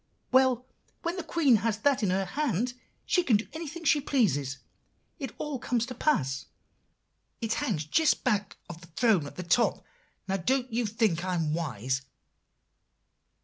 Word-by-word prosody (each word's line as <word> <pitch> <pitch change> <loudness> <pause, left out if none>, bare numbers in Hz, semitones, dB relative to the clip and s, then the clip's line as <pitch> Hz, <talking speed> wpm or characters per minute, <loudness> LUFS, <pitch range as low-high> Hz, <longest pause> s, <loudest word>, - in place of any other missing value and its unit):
Well, 255 -1 +4 0.4
when 340 +1 -1
the 360 - -3
Queen 300 -6 +4
has 220 0 0
that 275 +3 +2
in 205 - +1
her 190 +1 +1
hand, 245 - -1 0.3
she 365 - +3
can 245 -11 +4
do 215 - -6
anything 325 +1 -6
she 300 -2 +4
pleases, 145 - +1 0.6
it 270 -5 -4
all 295 -4 -3
comes 235 -1 0
to 255 - -6
pass. 135 - 0 0.9
It 225 -1 -1
hangs 155 -1 -1
just 310 - +2
back 210 -5 0
of 170 0 -9
the 170 - -13
throne, 180 - +2
at - - -11
the 180 - -5
top. 180 +7 +2 0.4
Now, 195 0 0
don't 255 +6 0
you 235 -1 +1
think 210 -5 +1
I 185 -1 -1
am 160 -3 0
wise? 130 -5 -2
225 Hz, 165 wpm, -29 LUFS, 175-265 Hz, 0.9 s, Well